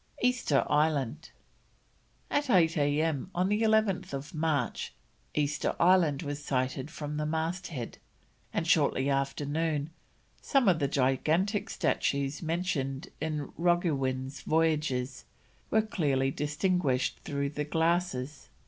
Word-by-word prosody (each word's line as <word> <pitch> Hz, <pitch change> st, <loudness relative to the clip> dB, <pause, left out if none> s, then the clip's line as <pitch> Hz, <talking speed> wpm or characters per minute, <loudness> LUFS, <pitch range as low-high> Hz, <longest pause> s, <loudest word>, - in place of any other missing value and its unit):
EASTER 245 Hz, -, +2 dB
ISLAND. 150 Hz, -1 st, +1 dB, 1.0 s
At 290 Hz, -1 st, +1 dB
8 170 Hz, -6 st, +4 dB
A.M., 150 Hz, +1 st, +1 dB
on 180 Hz, +2 st, +1 dB
11th 195 Hz, -9 st, +1 dB
March, 155 Hz, -5 st, -1 dB, 0.4 s
Easter 150 Hz, 0 st, 0 dB
Island 170 Hz, -5 st, +4 dB
was 145 Hz, 0 st, -5 dB
sighted 130 Hz, 0 st, -1 dB
from 150 Hz, -2 st, -5 dB
the 150 Hz, -, -1 dB
masthead, 160 Hz, -4 st, -3 dB, 0.5 s
and -, -, -1 dB
shortly 135 Hz, +2 st, +3 dB
after 135 Hz, +1 st, -1 dB
noon 155 Hz, 0 st, -1 dB, 0.5 s
some 270 Hz, -5 st, +2 dB
of 175 Hz, -4 st, +4 dB
the 140 Hz, -, +1 dB
gigantic 160 Hz, -, +1 dB
statues 140 Hz, +1 st, 0 dB
mentioned 160 Hz, -5 st, -2 dB
in 155 Hz, -3 st, -3 dB
Roggewin's 140 Hz, -7 st, 0 dB
Voyages 150 Hz, -5 st, 0 dB, 0.5 s
were 220 Hz, 0 st, +3 dB
clearly 140 Hz, -10 st, 0 dB
distinguished 150 Hz, -3 st, 0 dB
through 140 Hz, -1 st, -2 dB
the 150 Hz, +1 st, -3 dB
glasses. 160 Hz, -3 st, -1 dB
150 Hz, 110 wpm, -30 LUFS, 140-175 Hz, 1.0 s, 8